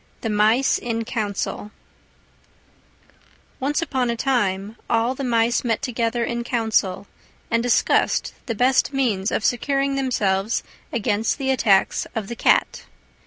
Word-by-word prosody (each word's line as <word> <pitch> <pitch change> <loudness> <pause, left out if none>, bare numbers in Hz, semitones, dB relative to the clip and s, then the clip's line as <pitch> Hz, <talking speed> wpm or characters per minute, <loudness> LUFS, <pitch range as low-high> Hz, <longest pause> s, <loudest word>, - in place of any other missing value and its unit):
THE 225 - -2
MICE 220 +6 +3
IN 230 -1 -3
COUNCIL 210 -3 -3 1.9
Once 290 +4 0
upon 260 -6 -1
a 235 - 0
time 210 -5 -1
all 230 +2 +2
the 275 - -6
Mice 235 -1 +1
met 230 0 -1
together 235 -2 -1
in 235 0 -2
Council, 220 -6 0 0.5
and 230 - +2
discussed 245 0 +2
the 230 - -2
best 260 +4 +2
means 220 -8 0
of 220 - -1
securing 275 +2 +1
themselves 220 -6 0 0.3
against 220 -1 0
the 270 -2 0
attacks 200 -7 +2
of 215 -3 -3
the 235 - -4
cat. - - +2
235 Hz, 130 wpm, -22 LUFS, 215-255 Hz, 1.9 s, MICE